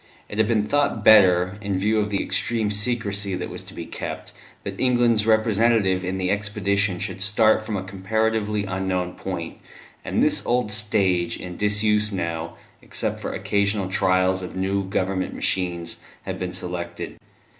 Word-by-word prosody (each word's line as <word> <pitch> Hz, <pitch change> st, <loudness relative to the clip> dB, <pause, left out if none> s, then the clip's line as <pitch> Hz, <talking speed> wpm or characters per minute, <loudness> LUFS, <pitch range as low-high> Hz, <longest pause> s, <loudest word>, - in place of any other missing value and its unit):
It 105 Hz, -, -6 dB
had 110 Hz, -, +4 dB
been 110 Hz, -2 st, +2 dB
thought 140 Hz, -4 st, 0 dB
better, 95 Hz, -2 st, +6 dB
in 100 Hz, -2 st, -1 dB
view 105 Hz, +3 st, +2 dB
of 105 Hz, 0 st, 0 dB
the 100 Hz, -1 st, 0 dB
extreme 110 Hz, -3 st, 0 dB
secrecy 105 Hz, -3 st, -1 dB
that -, -, -5 dB
was -, -, -7 dB
to -, -, -11 dB
be -, -, -6 dB
kept, -, -, -6 dB, 0.3 s
that -, -, -6 dB
England's 120 Hz, -4 st, +3 dB
representative 110 Hz, -3 st, +3 dB
in 95 Hz, +1 st, -2 dB
the 95 Hz, 0 st, 0 dB
expedition 100 Hz, -1 st, 0 dB
should 95 Hz, -, -4 dB
start 110 Hz, +2 st, +4 dB
from 110 Hz, -2 st, -3 dB
a 95 Hz, -, -4 dB
comparatively 105 Hz, +2 st, -1 dB
unknown 95 Hz, -1 st, -2 dB
point, 85 Hz, -4 st, -5 dB, 0.5 s
and -, -, 0 dB
this -, -, +3 dB
old 120 Hz, -3 st, 0 dB
stage, 100 Hz, -5 st, +1 dB
in 90 Hz, -1 st, -7 dB
disuse 105 Hz, +1 st, +1 dB
now, 85 Hz, -3 st, -3 dB, 0.2 s
except -, -, -3 dB
for -, -, -3 dB
occasional 100 Hz, -1 st, 0 dB
trials 95 Hz, -1 st, +2 dB
of 90 Hz, -, -7 dB
new 95 Hz, +1 st, 0 dB
Government 95 Hz, 0 st, -1 dB
machines, 85 Hz, -2 st, -2 dB, 0.3 s
had -, -, -5 dB
been 90 Hz, -1 st, -3 dB
selected. 85 Hz, -1 st, -5 dB
100 Hz, 160 wpm, -23 LUFS, 95-105 Hz, 0.5 s, better